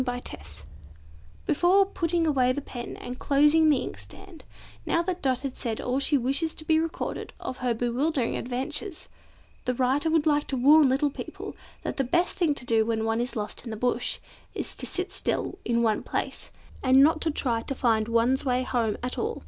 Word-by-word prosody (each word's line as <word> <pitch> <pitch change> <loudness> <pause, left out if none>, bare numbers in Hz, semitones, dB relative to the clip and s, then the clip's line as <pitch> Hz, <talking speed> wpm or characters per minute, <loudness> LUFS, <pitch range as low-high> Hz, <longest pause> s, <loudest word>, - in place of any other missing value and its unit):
Finale 245 -1 -3 1.2
Before 385 +3 +4
putting 335 -3 0
away 260 -5 +3
the 285 - -2
pen 245 -4 -7
and 250 +1 -7
closing 300 +3 +4
the 295 - +4
inkstand, 100 0 -10 0.4
now 335 - +1
that 360 0 -3
Dot 260 -2 0
has 275 -2 -4
said 225 -3 -3
all 250 +2 -1
she 285 +1 +3
wishes 275 +6 0
to 310 - -4
be 315 0 +3
recorded 330 0 -4
of 255 - -5
her 245 -2 0
bewildering 245 +3 0
adventures, 295 - -3 0.6
the 250 - 0
writer 265 +5 +1
would 320 -1 +2
like 295 -1 +2
to 270 - -1
warn 285 +3 +6
little 280 +2 +1
people, - - -7 0.3
that - - -4
the 270 - +2
best 345 +8 +1
thing 320 -5 +2
to 250 - -6
do 225 -2 +3
when 220 0 -1
one 225 +1 0
is 250 +2 -3
lost 210 -2 -4
in 240 - -7
the 220 - -5
bush, 245 +1 0 0.4
is - - -3
to - - -3
sit 365 +1 -3
still 380 - -1
in 235 0 +1
one 220 -2 +2
place, - - -4 0.3
and 265 +1 +6
not 310 +1 +3
to 325 - 0
try 245 -6 0
to 275 - -4
find 225 -4 +2
one's 235 +3 +2
way 255 -1 +1
home 235 -4 0
at 250 - -3
all. 450 +1 -2
265 Hz, 195 wpm, -27 LUFS, 245-310 Hz, 1.2 s, warn